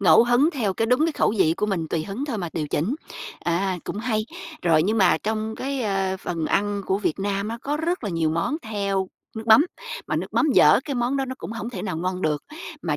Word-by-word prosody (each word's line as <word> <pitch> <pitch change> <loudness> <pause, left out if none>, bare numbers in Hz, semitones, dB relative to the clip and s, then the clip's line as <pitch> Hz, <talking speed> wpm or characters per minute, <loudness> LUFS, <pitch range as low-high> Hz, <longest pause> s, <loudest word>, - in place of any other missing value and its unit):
ngẫu 220 +4 +7
hứng 245 +6 +4
theo 215 -9 -1
cái 225 - 0
đúng 255 +7 +3
cái 325 - 0
khẩu - - +2
vị 160 -3 +4
của 210 - 0
mình 175 -6 -1
tùy 160 0 -1
hứng 215 +8 -4
thôi 255 -7 -3
mà 175 -3 -3
điều 155 -2 -2
chỉnh. 185 - 0 0.5
Ờ, 170 0 +1 0.3
cũng 205 - -4
hay! 215 -2 -1 0.4
Rồi 160 -3 +4
nhưng 215 +5 +1
mà 180 -4 +5
trong 220 +1 -2
cái, 275 0 -3
ơ, 195 -3 0
phần 170 -4 -3
ăn 205 +2 0
của 190 +1 +1
Việt 195 -3 -1
Nam 200 +1 -1
á 230 - -4
có 290 +2 -1
rất 330 - -1
là 200 - -2
nhiều 165 -2 +1
món 170 - 0
theo 200 -3 -1 0.3
nước 220 - -5
mắm 230 +9 +7 0.4
mà - - -1
nước - - -2
mắm 320 - +3
dở - - +7
cái 280 - -3
món 245 +2 0
đó 270 - 0
nó 260 - -5
cũng - - -6
hổng 230 +1 -5
thể - - -5
nào 185 -5 -3
ngon 185 +2 -2
được, 150 -2 0 0.4
mà - - 0
205 Hz, 250 wpm, -24 LUFS, 185-240 Hz, 0.5 s, ngẫu